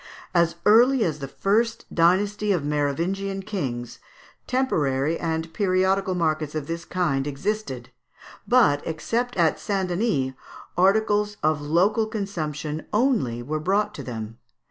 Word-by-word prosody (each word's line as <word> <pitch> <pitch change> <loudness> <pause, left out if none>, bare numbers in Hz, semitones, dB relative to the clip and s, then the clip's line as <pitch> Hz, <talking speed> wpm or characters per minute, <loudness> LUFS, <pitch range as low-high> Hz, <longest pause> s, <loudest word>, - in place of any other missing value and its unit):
As 170 -2 +3
early 240 +4 +6
as 155 -5 -1
the 135 - -5
first 225 - 0
dynasty 200 +5 +2
of 170 -7 0
Merovingian 170 +7 -1
kings, 130 - -4 0.5
temporary 155 - 0
and 160 0 -3
periodical 190 -1 +1
markets 155 -3 -1
of 155 -2 -2
this 165 +1 -5
kind 145 -7 0
existed; 140 - -3 0.6
but, 230 -13 +4
except 230 +10 -2
at 165 -3 +2
St. 195 -3 -1
Denis, 175 - 0 0.4
articles 205 +2 +2
of 155 -1 +2
local 185 +9 +2
consumption 155 -8 -4
only 210 - +1
were 155 +5 -2
brought 200 +6 +1
to - - -7
them. 115 -2 -7
175 Hz, 125 wpm, -24 LUFS, 150-210 Hz, 0.6 s, early